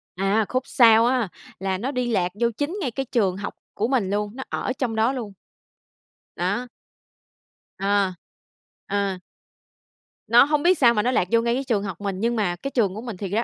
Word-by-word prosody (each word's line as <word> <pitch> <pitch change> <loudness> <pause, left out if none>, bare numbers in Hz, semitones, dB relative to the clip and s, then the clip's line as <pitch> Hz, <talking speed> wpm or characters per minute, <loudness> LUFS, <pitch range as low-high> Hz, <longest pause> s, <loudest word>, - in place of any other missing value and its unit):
À, 195 +3 +1
khúc 255 0 0
sau 230 -3 +6
á, 245 -4 +1 0.3
là 190 -1 -1
nó 255 +8 -3
đi 250 -2 -1
lạc 180 -4 +1
vô 235 - +4
chính 310 +8 -2
ngay 255 - -1
cái 270 +3 -3
trường 195 -6 +1
học 200 - -5 0.2
của 220 - -1
mình 240 -7 +1
luôn, 205 +2 -2
nó 265 - -5
ở - - -2
trong 240 -4 -1
đó 225 +4 +2
luôn. 220 -6 -5 1.0
Đó. 200 +8 -1 1.1
Ờ. 195 -1 +1 0.7
Ờ. 200 -1 -1 1.1
Nó 235 +2 +7
hông 295 +2 +1
biết 360 -1 +4
sao 240 -5 +5
mà 210 - +1
nó 250 +4 +1
lạc 180 -7 +1
vô 230 0 +4
ngay 235 0 +1
cái 265 +3 -1
trường 220 -6 0
học 195 -2 -6
mình, 195 -2 -3
nhưng 235 +2 0
mà 190 -5 0
cái 275 +10 -6
trường 205 -8 +1
của 215 - -6
mình 230 -5 -6
thiệt 195 -1 -5
ra 220 +3 +1
225 Hz, 205 wpm, -23 LUFS, 200-250 Hz, 1.1 s, Nó